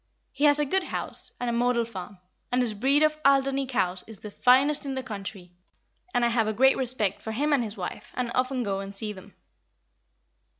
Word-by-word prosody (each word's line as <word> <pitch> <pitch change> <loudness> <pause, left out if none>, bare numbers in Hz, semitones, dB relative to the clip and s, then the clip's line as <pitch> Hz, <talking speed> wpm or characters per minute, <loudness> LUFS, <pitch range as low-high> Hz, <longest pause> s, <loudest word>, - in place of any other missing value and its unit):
He 285 - 0
has 290 0 +5
a 295 - +1
good 375 +6 0
house, - - -3
and 245 - -3
a 235 - 0
model 240 0 +1
farm, 200 -3 -8 0.3
and 250 - +2
his 230 -3 -2
breed 270 +8 +2
of 305 0 +2
Alderney 275 0 +3
cows 185 -8 -1
is 220 -2 -9
the 210 - -9
finest 270 +7 +4
in 275 -2 -4
the 260 - -3
country; 195 -4 -7 0.6
and 245 -6 +2
I - - +3
have 230 -2 +1
a 215 - 0
great 265 +4 +5
respect 235 -7 +1
for 220 - -5
him 290 +6 +1
and 270 -4 +2
his 215 -1 -6
wife, - - -6
and 245 -2 -2
often 255 0 0
go 195 -2 -2
and 195 0 -7
see 210 +1 -2
them." 195 +1 -14
245 Hz, 215 wpm, -26 LUFS, 210-270 Hz, 0.6 s, has